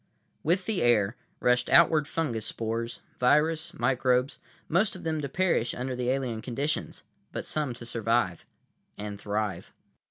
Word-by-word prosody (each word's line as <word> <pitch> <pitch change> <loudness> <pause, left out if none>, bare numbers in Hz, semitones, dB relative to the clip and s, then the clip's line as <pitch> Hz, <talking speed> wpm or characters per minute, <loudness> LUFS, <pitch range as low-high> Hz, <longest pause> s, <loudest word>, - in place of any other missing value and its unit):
With 180 +4 +1
the 210 -6 -1
air 110 -2 +3 0.2
rushed 125 0 +2
outward 155 -3 +6
fungus 125 -11 -2
spores, 115 +1 -3 0.2
virus, 155 +5 +3
microbes; 125 +1 +1 0.3
most 190 +6 +2
of 185 - -9
them 160 -1 -1
to 140 - -3
perish 175 -10 +1
under 125 +1 -3
the 125 0 -1
alien 130 -4 -1
conditions, 135 +6 -3 0.3
but - - -4
some 145 -5 -2
to 120 - -9
survive—and 105 -2 -3
thrive. 105 -4 -2
125 Hz, 135 wpm, -28 LUFS, 115-155 Hz, 0.3 s, outward